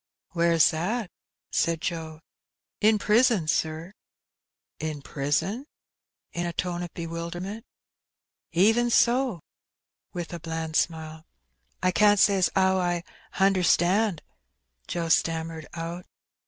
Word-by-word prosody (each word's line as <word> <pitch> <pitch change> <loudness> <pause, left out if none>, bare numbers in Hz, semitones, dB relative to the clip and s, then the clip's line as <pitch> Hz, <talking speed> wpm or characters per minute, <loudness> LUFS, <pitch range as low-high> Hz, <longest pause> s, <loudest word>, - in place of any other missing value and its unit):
"Where's 170 -2 +4
that?" 185 +6 -2 0.4
said 165 -1 +1
Joe. 160 -2 -5 0.6
"In 215 0 +4
prison, 215 -4 +3
sir!" 160 +4 -1 0.9
"In 155 -2 -4
prison?" 160 - -2 0.7
in 175 0 -2
a 170 - -4
tone 175 0 -2
of 175 -1 -6
bewilderment. 170 +6 -5 0.8
"Even 225 +8 +3
so," 240 - +2 0.7
with 175 -1 -6
a 170 - -5
bland 160 -1 -5
smile. 160 -1 -2 0.6
I 185 - +3
can't 205 +1 +4
say 200 -1 +5
as 180 - +3
'ow 190 0 +3
I 175 -1 -1 0.3
hunderstand," 190 0 +2 0.6
Joe 170 -1 -2
stammered 160 -1 0
out. 170 +2 -6
175 Hz, 110 wpm, -26 LUFS, 165-195 Hz, 0.9 s, say